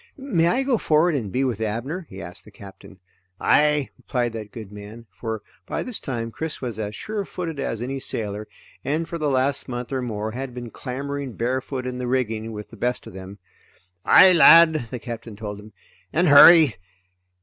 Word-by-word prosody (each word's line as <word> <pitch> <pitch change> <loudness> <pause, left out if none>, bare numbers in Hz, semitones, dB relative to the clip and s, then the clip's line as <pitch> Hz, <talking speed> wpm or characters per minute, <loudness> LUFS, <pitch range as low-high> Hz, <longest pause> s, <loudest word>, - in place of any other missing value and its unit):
"May 230 -12 +1
I 250 +9 +1
go 260 -5 +1
forward 160 +3 +3
and 115 -9 -3
be 130 +5 0
with 120 -5 -2
Abner?" 130 - -3
he 95 +1 -9
asked 90 +3 -10
the - - -15
Captain. 100 -1 -14 0.4
"Aye," 150 -2 +3
replied 120 -2 -2
that 110 -2 -7
good 110 -4 -9
man, 105 +3 -10
for 110 +1 -5 0.2
by - - -3
this 250 -4 -5
time 115 -3 -4
Chris 160 +5 -5
was 120 -4 -5
as 105 -1 -4
surefooted 180 -7 -5
as 115 -4 -3
any 135 +2 -4
sailor 105 -4 -3 0.4
and 155 +5 -1
for 170 - -5
the 150 -1 0
last 135 +1 0
month 120 0 -5
or 130 - -1
more 110 -3 -4
had 130 +1 -6
been 120 -2 -7
clambering 140 0 -5
barefoot 130 +2 -3
in 125 0 -4
the 125 - -3
rigging 115 -3 -1
with 105 -1 -8
the 115 - -12
best 125 +3 -2
of - - -11
them. 95 +1 -9 0.7
"Aye 190 -1 +7
lad," 160 -5 +7
the 125 - -5
Captain 115 -2 -8
told 105 -1 -7
him, 105 +1 -13 0.4
"and 175 +3 +2
hurry. 145 - +8
125 Hz, 190 wpm, -23 LUFS, 110-150 Hz, 0.7 s, hurry